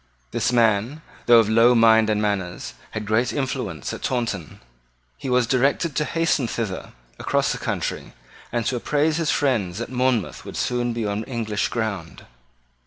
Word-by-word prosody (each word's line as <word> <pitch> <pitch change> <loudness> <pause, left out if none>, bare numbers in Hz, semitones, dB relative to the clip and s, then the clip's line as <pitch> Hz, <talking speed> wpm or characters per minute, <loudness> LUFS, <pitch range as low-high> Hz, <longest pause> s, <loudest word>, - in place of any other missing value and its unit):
This - - 0
man, 120 +5 +2 0.2
though 120 -1 +8
of 115 -2 +5
low 115 +3 +5
mind 110 -1 +5
and 105 -1 +1
manners, 100 -4 -2 0.2
had 105 -1 -5
great 110 +4 +1
influence 135 -3 -3
at - - -7
Taunton. 115 - -3 0.6
He 135 - -6
was 125 -1 +3
directed 135 +5 +1
to 150 - +1
hasten 160 -6 +1
thither 110 -5 -4 0.3
across - - +1
the - - -3
country, - - -3 0.4
and 120 -1 -1
to 130 - 0
apprise 150 +5 +1
his 165 -3 0
friends 110 -11 +1
that 120 +2 -5
Monmouth 125 -5 0
would - - -8
soon 120 -1 0
be 115 -1 -2
on 105 +1 -2
English 110 -4 -2
ground. 100 -8 -4
115 Hz, 165 wpm, -23 LUFS, 110-130 Hz, 0.6 s, though